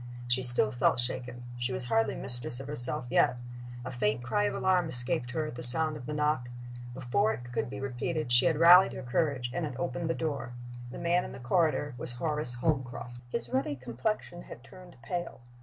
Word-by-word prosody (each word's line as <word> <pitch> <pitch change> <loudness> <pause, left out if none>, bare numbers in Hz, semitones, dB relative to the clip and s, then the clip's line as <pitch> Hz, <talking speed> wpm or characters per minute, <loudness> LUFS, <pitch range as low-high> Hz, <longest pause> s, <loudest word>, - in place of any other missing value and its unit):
She 120 +1 +2
still 120 -3 +3
felt 120 +1 +2
shaken. 120 0 -4 0.2
She 125 +1 -1
was 125 - -2
hardly 110 -2 +1
mistress 120 0 +2
of 135 - -7
herself 125 -3 -3
yet. 125 - +3 0.5
A 130 - -4
faint 115 -1 0
cry 205 +12 +1
of - - -1
alarm 180 -3 +2
escaped 125 +1 -1
her 155 +5 -2
at 155 - -6
the 120 - -7
sound 155 +6 +5
of 125 -4 -8
the 150 - -3
knock. 150 -5 0 0.5
Before 120 -4 +1
it 120 +2 -8
could 120 - -2
be 135 +1 -6
repeated 135 +2 -3
she 120 +6 +5
had 160 -3 +2
rallied 175 +3 +8
her - - -6
courage, 125 -1 0
and 175 - -2
had 145 -5 -4
opened 160 +6 -2
the 165 - +1
door. 145 -6 -3 0.4
The - - -8
man 170 +1 +1
in - - -7
the 130 - -9
corridor 145 +2 +1
was 120 - -2
Horace 150 -2 -1
Holmcroft. 125 -3 -2
His 120 -1 -3
ruddy 135 +3 0
complexion 135 - -3
had 120 - -11
turned 180 +3 -14
pale. 175 +3 -4
130 Hz, 205 wpm, -30 LUFS, 120-155 Hz, 0.5 s, rallied